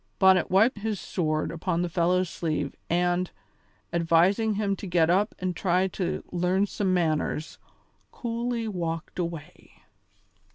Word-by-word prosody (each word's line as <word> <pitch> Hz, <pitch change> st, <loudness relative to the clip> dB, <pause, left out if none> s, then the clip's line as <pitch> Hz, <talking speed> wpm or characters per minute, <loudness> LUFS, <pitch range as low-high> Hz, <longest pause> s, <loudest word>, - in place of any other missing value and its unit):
Bonnet 190 Hz, -2 st, +5 dB
wiped 205 Hz, +4 st, +4 dB
his 210 Hz, -2 st, -2 dB
sword 155 Hz, -3 st, -1 dB
upon 170 Hz, +1 st, -1 dB
the -, -, 0 dB
fellow's 180 Hz, +2 st, +1 dB
sleeve 155 Hz, -4 st, -2 dB, 0.2 s
and, 175 Hz, +1 st, +1 dB, 0.6 s
advising 175 Hz, +6 st, +3 dB
him 200 Hz, -1 st, 0 dB
to 200 Hz, -, -7 dB
get 170 Hz, -2 st, +3 dB
up 200 Hz, +4 st, +2 dB
and 185 Hz, -1 st, -2 dB
try 185 Hz, +2 st, +2 dB
to 180 Hz, 0 st, -3 dB
learn 180 Hz, +3 st, +1 dB
some 200 Hz, -1 st, -1 dB
manners, 160 Hz, -3 st, -1 dB, 0.5 s
coolly 235 Hz, -1 st, -3 dB
walked 170 Hz, -4 st, -4 dB
away. 170 Hz, -4 st, -7 dB
180 Hz, 130 wpm, -27 LUFS, 170-195 Hz, 0.6 s, Bonnet